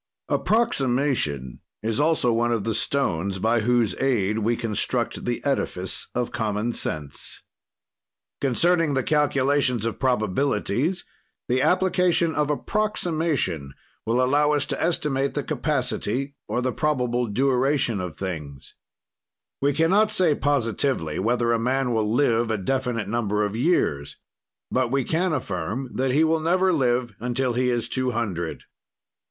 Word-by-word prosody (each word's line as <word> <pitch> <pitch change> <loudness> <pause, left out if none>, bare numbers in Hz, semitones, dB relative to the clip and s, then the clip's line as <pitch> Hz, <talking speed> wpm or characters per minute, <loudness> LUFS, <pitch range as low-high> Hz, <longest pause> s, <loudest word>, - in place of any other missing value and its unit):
"Approximation 130 - +1 0.2
is 110 0 -1
also 150 -6 +2
one 120 +1 +1
of 115 -4 0
the 115 - -1
stones 100 -6 0
by 115 +4 +2
whose 115 -3 +2
aid 110 -6 +1
we 115 +2 +1
construct 115 -4 -2
the - - -3
edifice - - -2
of 125 -1 -1
common 110 +1 -1
sense. 75 -9 -5 1.0
"Concerning 160 +3 +2
the 130 - +1
calculations 140 -5 +2
of 115 - -3
probabilities, 130 - 0 0.4
the 130 +1 +1
application 180 -2 +2
of 150 -1 0
approximation 155 - -1 0.3
will 120 +3 +1
allow 145 +3 +3
us 145 -2 +1
to - - -3
estimate 140 -5 0
the 145 - -1
capacity 135 -2 -2
or 125 - -1
the 130 -1 0
probable 125 -5 0
duration 130 -1 +1
of 90 -4 -5
things. 75 -8 -6 0.9
"We 140 +1 +3
can 165 +4 +2
not 210 +2 +4
say 185 -7 +3
positively 130 - 0
whether 120 +3 +1
a 115 - +1
man 125 +1 0
will 110 -1 0
live 120 -2 +2
a 110 - 0
definite 125 +2 -1
number 105 -2 0
of 105 +1 -4
years 115 - 0 0.5
but 130 -1 +1
we 135 +1 +1
can 175 +7 0
affirm 115 - -3
that 130 +1 0
he 145 +5 +3
will 160 0 +2
never 185 +3 +2
live 125 -5 +1
until 125 +1 -1
he 125 +1 +1
is 120 -1 0
two 130 +1 0
hundred. 100 -9 -3
125 Hz, 140 wpm, -24 LUFS, 110-145 Hz, 1.0 s, not